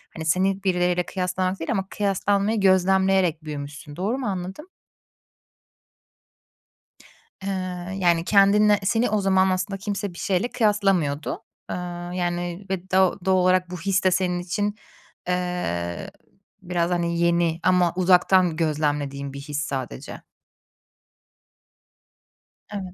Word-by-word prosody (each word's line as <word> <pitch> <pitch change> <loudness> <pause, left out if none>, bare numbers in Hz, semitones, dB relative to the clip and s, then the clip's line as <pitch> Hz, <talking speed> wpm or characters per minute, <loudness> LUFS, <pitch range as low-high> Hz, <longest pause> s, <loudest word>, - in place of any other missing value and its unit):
hani, 160 - -5
seni 190 +4 +1
birileriyle 180 -1 +1
kıyaslamak 185 +1 -2
değil 165 - -3
ama 190 -4 -1
kıyaslanmayı 205 +2 0
gözlemleyerek 190 -3 +3
büyümüşsün. 145 0 -7
Doğru 205 - -1
mu 265 - -3
anladım? 190 - -5 2.7
Eee, 195 - -3 0.5
yani, 170 -2 +3
kendinle 205 +1 +5
seni 225 +5 +2
o 210 0 +1
zaman 190 -1 +3
aslında 185 +1 -1
kimse 200 -1 -4
bir - - -13
şeyle 190 +4 0
kıyaslamıyordu, 195 - 0 0.3
eee, - - -2 0.4
yani, 175 +1 -3
ve 190 -1 -4
do 190 +1 +3
doğal 190 0 +4
olarak 185 0 +3
bu 180 - -5
his 195 +2 0
de 185 - +4
senin 180 -1 0
için, 205 +4 -2 0.5
eee, 180 - -2 0.5
biraz, 175 -1 -1
hani, 170 -1 0
yeni 170 -1 +2
ama 180 -2 +3
uzaktan 180 -1 +4
gözlemlediğim 145 -3 -1
bir 140 - -7
his 145 0 -4
sadece. 130 - -6 2.5
Evet. 190 -3 -5
180 Hz, 120 wpm, -24 LUFS, 170-195 Hz, 2.7 s, kendinle